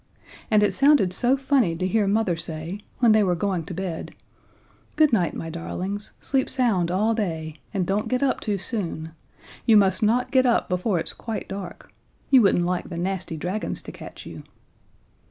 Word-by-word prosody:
And 215 -1 +4
it 205 - +2
sounded 275 -10 +4
so 250 +7 +2
funny 265 -10 +2
to 180 - -2
hear 210 +1 +1
Mother 200 -3 +1
say, 165 +3 -5 0.2
when 235 -3 +4
they 215 0 +5
were 180 -2 +1
going 180 -2 -1
to 180 - -7
bed: 180 -3 -5 0.8
"Good 305 -4 +4
night, 180 -7 +2
my 165 - -5
darlings, 190 +5 -5
sleep 270 -2 0
sound 220 -10 +1
all 210 +5 +1
day, 160 -8 -3
and 195 -4 -1
don't 200 +3 -1
get 255 +1 0
up 270 - +1
too 210 -3 -1
soon. 175 -6 -3 0.6
You 225 -2 +7
must 190 -2 +3
not 230 +4 +2
get 260 -1 +4
up 240 - +2
before 180 +2 0
it's 165 - -2
quite 225 -2 -5
dark. 190 -3 -8 0.4
You 265 -2 +8
wouldn't 185 -4 +3
like 180 0 -2
the 170 - -6
nasty 180 -2 -3
dragons 185 +7 -3
to - - -8
catch - - -11
you." - - -9
195 Hz, 185 wpm, -24 LUFS, 175-225 Hz, 0.8 s, You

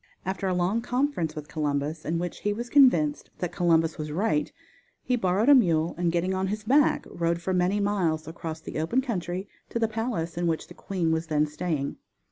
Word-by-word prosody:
After 190 +1 -2
a 185 - +1
long 180 +6 +1
conference 245 - -1
with 150 -1 -7
Columbus, 150 +1 -2
in 165 +2 0
which 175 0 -4
he 205 - 0
was 235 +3 -6
convinced 170 - +4
that 180 - -3
Columbus 165 -3 +2
was 155 0 -4
right, 155 -3 0 0.5
he 250 - +1
borrowed 195 0 +1
a 290 - +9
mule 170 - +3
and 175 0 0
getting 175 +2 0
on 190 0 0
his 210 +2 -3
back 275 +6 +3
rode 170 0 -1
for 185 +2 -2
many 180 +3 +2
miles 180 -7 0
across 160 0 -6
the 155 - -5
open 165 +12 +1
country 190 -6 -3 0.2
to - - -3
the 230 -1 +2
palace 215 -7 -3
in 175 - +1
which 160 -1 -1
the - - -10
queen 180 -4 -2
was 160 +1 -1
then 150 -1 +2
staying. 150 -2 -3
175 Hz, 205 wpm, -27 LUFS, 160-205 Hz, 0.5 s, a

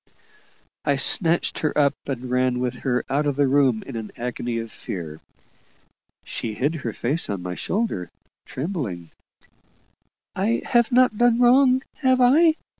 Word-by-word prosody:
I 140 - +1
snatched 165 +4 +2
her 155 - -1
up 140 -2 +3
and 130 -2 -4
ran 125 0 +1
with 125 -1 -3
her 125 -2 -1
out 145 +2 0
of 145 - 0
the 140 0 +2
room, 130 -5 +2
in 135 - -8
an 110 -2 -5
agony 120 -1 -3
of 115 -1 -5
fear. 80 -4 -7 1.0
She 110 -2 -5
hid 145 +8 0
her 135 -8 -4
face 140 +9 0
on 100 -3 -4
my 90 0 -4
shoulder, 190 - -2 0.4
trembling, 125 - -5 1.2
"I 215 +5 0
have 240 +1 +2
not 250 -3 +3
done 240 -1 +4
wrong, 255 +1 +5
have 260 -2 +2
I? 310 +6 +5
140 Hz, 150 wpm, -23 LUFS, -, 1.2 s, wrong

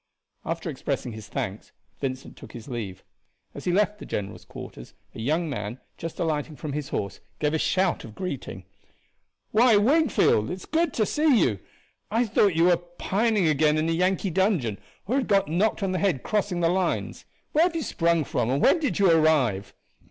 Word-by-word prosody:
After - - -3
expressing 125 - -3
his 110 -1 -9
thanks 100 +2 -5 0.3
Vincent 130 -1 -4
took - - -13
his 115 -2 -9
leave. 105 -8 -5 0.5
As - - -9
he 180 - +2
left 210 +3 +1
the - - -8
general's 100 -1 -5
quarters, - - -10 0.2
a - - -9
young 155 +9 0
man, 120 -3 -4 0.2
just 165 -1 -7
alighting 155 -2 -1
from 150 -1 -6
his 145 -1 -4
horse, 100 -1 -3 0.2
gave 150 0 0
a 160 - +1
shout 185 +2 +1
of 110 -2 -11
greeting. 135 - -5 0.9
"Why, 225 0 +5
Wingfield, 250 - +3
it - - -2
is 185 - -11
good 325 0 +1
to 215 - +2
see 300 -1 +3
you! 105 -6 0 0.5
I 230 +3 +2
thought 205 -4 +3
you 165 - +3
were 175 -1 +5
pining 195 +3 0
again 155 0 +3
in 155 +1 +1
a - - +1
Yankee 185 +3 +1
dungeon, 170 - +1 0.3
or 245 +7 0
had 270 - 0
got 195 -4 +3
knocked 200 +7 +1
on 190 - 0
the 185 - -1
head 180 -11 0
crossing 205 -4 -1
the 165 - +3
lines. 180 0 -1 0.3
Where 315 +3 +4
have 355 -2 -1
you 325 - -1
sprung 170 -6 +1
from, 120 - -1
and 135 +2 +1
when 340 - +4
did 280 - -1
you 195 -3 +5
arrive?" 145 -12 +2
170 Hz, 195 wpm, -26 LUFS, 135-205 Hz, 0.9 s, Why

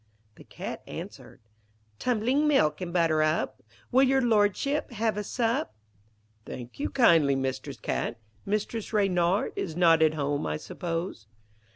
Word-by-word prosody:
The - - -15
Cat - - -7
answered - - -9 0.6
'Tumbling 255 +5 +1
milk 155 - +2
and 175 -1 -4
butter 165 -3 +2
up. 155 +1 0 0.3
Will 260 +1 +5
your 270 0 +4
Lordship 235 +4 +1
have 220 -1 0
a 210 - -3
sup?' 225 - -1 0.7
'Thank 120 - -8
you 290 - -1
kindly, 165 - +4
Mistress 135 -1 -3
Cat. - - -2 0.3
Mistress 210 +2 -3
Reynard 190 -2 +2
is 160 -4 -4
not 165 -2 +5
at 155 0 +4
home, 145 - -1
I 75 0 -2
suppose.' 165 - -5
185 Hz, 140 wpm, -27 LUFS, 155-230 Hz, 0.7 s, Will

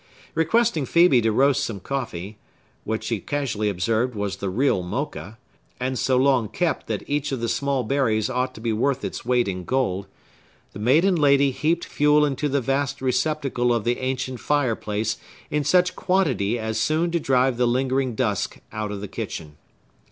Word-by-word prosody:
Requesting 165 - +2
Phœbe 170 -5 +5
to 110 0 +2
roast 135 +4 +3
some 105 -4 -4
coffee,—which 110 -2 -6
she 115 -3 -2
casually 115 -4 -2
observed 110 +6 0
was 100 -1 -3
the 100 - -3
real 115 0 +1
Mocha, 95 +4 -5 0.4
and 130 0 -2
so 130 -1 +2
long 130 -4 +3
kept 165 +9 -1
that - - -3
each 145 0 -1
of 135 - -2
the 115 - -2
small 130 +3 0
berries 110 -4 +1
ought 130 0 -2
to - - -9
be 115 -1 0
worth 130 +5 0
its - - -5
weight 125 -2 +2
in 90 -2 -3
gold,—the 100 -4 -5
maiden 155 - +4
lady 140 -2 +4
heaped 165 +6 0
fuel 150 0 +3
into 145 +1 -1
the 140 0 +1
vast 135 +2 -1
receptacle 130 -1 0
of 115 -3 +1
the 120 +2 0
ancient 130 -1 -3
fireplace 110 -7 0 0.3
in 150 0 +1
such 180 +4 +3
quantity 180 - +1
as 110 -1 -2
soon 165 +3 +1
to 170 - +1
drive 130 -3 +2
the 125 0 +2
lingering 130 0 0
dusk 105 -5 -1
out 110 -1 -4
of 100 -1 -5
the 105 - -5
kitchen. 75 -5 -6
130 Hz, 170 wpm, -23 LUFS, 110-140 Hz, 0.4 s, Phœbe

